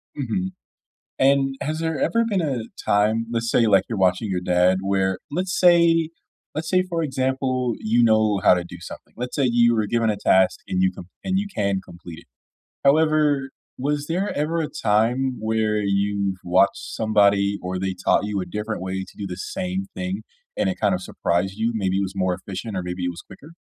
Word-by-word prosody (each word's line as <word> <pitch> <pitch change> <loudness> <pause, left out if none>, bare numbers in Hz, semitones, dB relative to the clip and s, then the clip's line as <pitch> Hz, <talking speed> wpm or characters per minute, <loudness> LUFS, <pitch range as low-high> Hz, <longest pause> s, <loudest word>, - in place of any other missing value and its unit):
Mhm. 170 +8 -2 0.7
And 135 0 +3
has 155 +2 -3
there 160 -1 -2
ever 230 0 +2
been 200 -4 +1
a 135 -8 -2 0.2
time- 110 +3 +2
let's 115 0 -1
say 115 - +3
like 100 -3 +4
you're 110 -4 -3
watching 95 +3 +1
your 90 -1 -1
dad- 90 +1 +3
where 95 -1 0
let's 180 +4 -2
say 170 -2 +5 0.4
let's 160 +1 -3
say 185 +2 +3
for 170 -3 -3
example, 130 -3 -1
you 115 +2 +2
know 110 -3 +3
how - - +6
to 90 -1 -2
do 90 0 -10
something - - -11
let's 125 +2 -5
say 140 - +2
you 120 0 +4
were 110 -2 +1
given 115 0 +1
a 105 - -1
task 95 -1 +3
and 95 0 0
you 95 - +4
can 90 - -10 0.2
and 190 0 +1
you 205 - -1
can 100 -3 0
complete 85 -1 -11
it. - - -22 0.6
However, 150 -2 +3 0.3
was 145 +2 -1
there 185 +5 -1
ever 160 +3 0
a 155 - -2
time 125 +1 +1
where 110 0 0
you've 100 -1 0
watched 95 +3 +3 0.2
somebody, 100 -2 +3
or 90 0 -3
they 95 0 -2
taught 90 +2 +1
you 105 -1 -2
a - - -3
different 105 +1 -4
way 95 0 -3
to - - -16
do 100 - -5
the 90 -2 -6
same 190 - -4
thing, 185 +1 -4 0.3
and - - +1
it 185 - -3
kinda 90 -2 +2
surprised 95 +1 -1
you, 115 +2 0
maybe 95 -3 0
it - - +1
was 95 -1 -4
more 95 -1 +1
efficient 95 +3 -6
or 90 - -1
maybe 90 0 -4
it 90 - 0
was 85 - -9
quicker? 150 - -14
110 Hz, 205 wpm, -23 LUFS, 95-145 Hz, 0.7 s, how